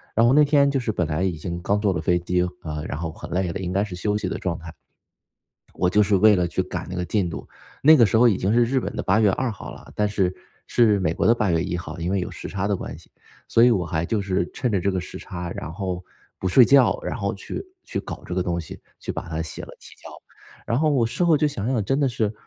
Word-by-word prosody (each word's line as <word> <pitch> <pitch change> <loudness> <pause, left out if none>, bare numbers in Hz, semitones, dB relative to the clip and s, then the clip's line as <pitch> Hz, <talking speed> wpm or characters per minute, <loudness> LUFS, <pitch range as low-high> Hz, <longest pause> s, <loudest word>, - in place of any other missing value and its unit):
然 115 +1 +5
后 - - +5
那 150 +1 +6
天 140 -1 +4
就 135 - 0
是 115 -3 -1
本 90 - 0
来 75 +4 -1
已 95 - +1
经 85 +2 -5
刚 100 +2 +1
坐 100 -3 +2
了 75 - -2
飞 90 +2 +2
机， 90 +1 0 0.2
啊， 75 -1 -5
然 70 - -4
后 80 -1 -3
很 - - -10
累 90 -1 0
的， - - -5
应 90 -1 -3
该 100 +1 +2
是 95 -4 -6
休 105 +3 -1
息 95 -3 -3
的 - - -3
状 90 -2 -2
态。 85 -1 -9 1.0
我 90 - +1
就 105 +2 +4
是 100 -1 +3
为 105 +2 +6
了 90 -1 +1
去 - - -1
赶 - - -5
那 90 - -4
个 90 - -2
进 95 0 0
度， - - -7 0.4
那 155 +3 +8
个 115 - +6
时 110 - +1
候 120 +2 +6
已 100 - +2
经 95 +3 0
是 120 0 +5
日 130 +2 +1
本 - - -5
的 - - -2
八 105 +4 +3
月 105 -3 +5
二 130 0 -1
号 100 - -9
了， - - -13
但 105 0 +1
是 95 -3 0 0.3
是 110 -4 +3
美 80 -2 0
国 - - 0
的 115 - +6
八 105 -5 0
月 80 +1 +2
一 90 -1 -2
号， 85 0 -7
因 85 +2 -2
为 100 - +1
有 - - -3
时 - - -8
差 100 0 -2
的 100 -2 +1
关 - - -7
系。 - - -20 0.4
所 115 - +4
以 125 - +6
我 90 -6 +1
还 80 +1 -1
就 105 +3 -1
是 95 -3 -1
趁 125 -4 -2
着 95 - +1
这 100 - +1
个 95 -1 -1
时 - - -9
差， 85 0 -6
然 75 - -6
后 90 -1 -4 0.4
不 95 - 0
睡 120 +7 +7
觉， 140 - +5
然 - - -3
后 - - -2
去 - - -6 0.2
去 - - -3
搞 - - -8
这 90 - -4
个 90 - +1
东 85 -1 -2
西， 80 - -10 0.2
去 - - -5
把 - - -6
它 80 0 -3
写 80 - -6
了 - - -9
提 - - -14
交。 - - -13 0.6
然 115 - +1
后 155 -1 +3
我 125 -5 +2
事 175 +9 -1
后 165 -3 +5
就 150 - +2
想 105 -6 -4
想 120 -5 +1
真 135 +7 0
的 140 - +3
是， 110 -3 -1
95 Hz, 310 characters per minute, -23 LUFS, 90-115 Hz, 1.0 s, 那